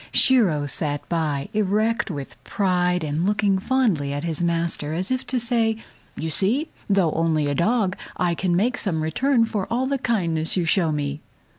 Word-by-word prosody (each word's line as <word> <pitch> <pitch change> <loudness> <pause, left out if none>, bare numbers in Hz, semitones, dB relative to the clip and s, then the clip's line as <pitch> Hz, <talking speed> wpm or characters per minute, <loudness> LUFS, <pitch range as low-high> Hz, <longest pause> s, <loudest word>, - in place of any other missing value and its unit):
Shiro 190 - +4
sat 145 0 -3
by 155 -4 -1
erect 215 +3 +1
with 145 -6 -7
pride 180 -3 0
and 155 +2 -1
looking 200 -1 +1
fondly 195 - +1
at 145 +1 -3
his 165 -1 -2
master 165 -3 0
as 185 +7 -2
if 255 0 -2
to 255 - 0
say, 230 -2 +1 0.4
"You 160 0 -4
see, 245 - 0 0.2
though 195 -5 +3
only 160 -2 +1
a 145 - 0
dog, 195 - +1 0.2
I 175 -1 +1
can 175 0 0
make 230 +8 +1
some 165 -7 -1
return 240 - +2
for 210 -4 -3
all 250 +3 0
the 275 0 -1
kindness 170 -10 +1
you 175 - +1
show 165 -1 +2
me." 145 0 -3
180 Hz, 175 wpm, -23 LUFS, 160-225 Hz, 0.4 s, Shiro